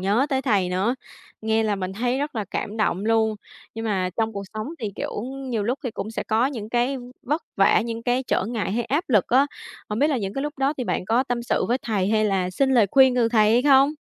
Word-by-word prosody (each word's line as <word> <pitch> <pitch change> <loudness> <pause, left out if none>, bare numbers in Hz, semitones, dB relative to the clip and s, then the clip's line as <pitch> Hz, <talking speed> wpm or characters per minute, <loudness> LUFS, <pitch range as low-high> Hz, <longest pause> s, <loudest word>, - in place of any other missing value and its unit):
nhớ 205 +8 +2
tới 265 -2 0
thầy 205 -8 +2
nữa, 190 +7 0 0.5
nghe 220 0 +2
là 210 -2 0
mình 185 -1 -4
thấy 245 +5 -1
rất 290 +1 -3
là 220 -3 -2
cảm 210 - -3
động 205 -3 0
luôn. 220 -1 +2 0.4
Nhưng 225 0 -5
mà 190 -4 0
trong 225 -1 0
cuộc 200 -1 -5
sống 215 +3 -4
thì, 215 -3 -4
kiểu, - - -4
nhiều 260 -3 -4
lúc 245 +6 -1
thì 250 - -1
cũng 215 0 -5
sẽ 225 - -3
có 225 +3 +2
những 230 -7 -5
cái 245 +4 0 0.3
vất 300 +6 -1
vả, 195 +2 +5
những 230 0 -4
cái 245 +2 +1
trở 245 - 0
ngại 220 -5 -2
hay 235 +2 -1
áp 295 +9 0
lực 215 -7 +3
á. 265 +4 +4 0.4
Hông 210 - -3
biết 290 - +3
là 285 - +1
những 195 -2 -4
cái 275 - -2
lúc 295 -1 -5
đó 270 +1 +2
thì 250 - -1
bạn - - -2
có 230 +6 +2
tâm 245 -2 -3
sự 235 - 0
với 245 +2 +2
thầy 200 -5 0
hay 215 0 +2
là 190 -3 0
xin 265 +8 +1
lời 240 -5 +5
khuyên 265 -2 +6
từ 240 -2 +3
thầy 215 -2 +4
hay 240 +2 +4
không? 275 +1 +5
230 Hz, 260 wpm, -24 LUFS, 210-260 Hz, 0.5 s, khuyên